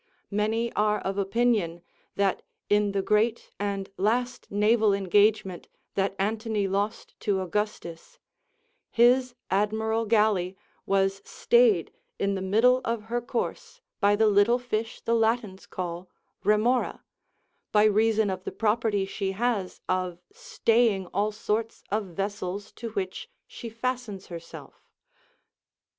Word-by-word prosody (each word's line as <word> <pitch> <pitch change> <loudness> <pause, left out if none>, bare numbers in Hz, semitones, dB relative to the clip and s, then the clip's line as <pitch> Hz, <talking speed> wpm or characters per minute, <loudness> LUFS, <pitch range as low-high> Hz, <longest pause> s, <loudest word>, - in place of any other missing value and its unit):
Many 220 +3 0
are 210 0 +2
of 195 +1 -3
opinion 200 -5 +1 0.3
that 200 -1 +1 0.3
in 205 0 +3
the 195 -1 -1
great 220 +3 +1
and 200 -1 -2
last 245 +5 -1
naval 210 0 +3
engagement 200 -1 +2 0.3
that 195 0 0
Antony 215 0 -1
lost 200 +2 -2
to 200 -2 0
Augustus, 185 -3 -4 0.7
his 245 +1 +4 0.2
admiral 220 +3 +1
galley 205 -4 +2 0.3
was 195 0 +1
stayed 235 -8 +3 0.3
in 200 0 0
the 190 - -3
middle 230 +7 +4
of 230 -3 -2
her 240 - +1
course 240 - -4 0.2
by 205 +1 +4
the 220 +1 +3
little 210 +3 +4
fish 230 -2 -3
the 230 - 0
Latins 225 -4 0
call 175 0 -5 0.3
remora, 225 +4 +2 0.7
by 210 0 +5
reason 215 0 +3
of 185 0 -5
the - - -4
property 215 -2 +1
she 195 0 -3
has 215 -3 -1
of 185 -2 -1
staying 240 - +1
all 205 +3 +1
sorts 220 +1 -2
of 210 0 0
vessels 195 +1 -4
to 230 - -7
which 200 - -4 0.2
she 235 - -8
fastens 230 -4 -4
herself. 170 0 -11
210 Hz, 125 wpm, -27 LUFS, 195-230 Hz, 0.7 s, by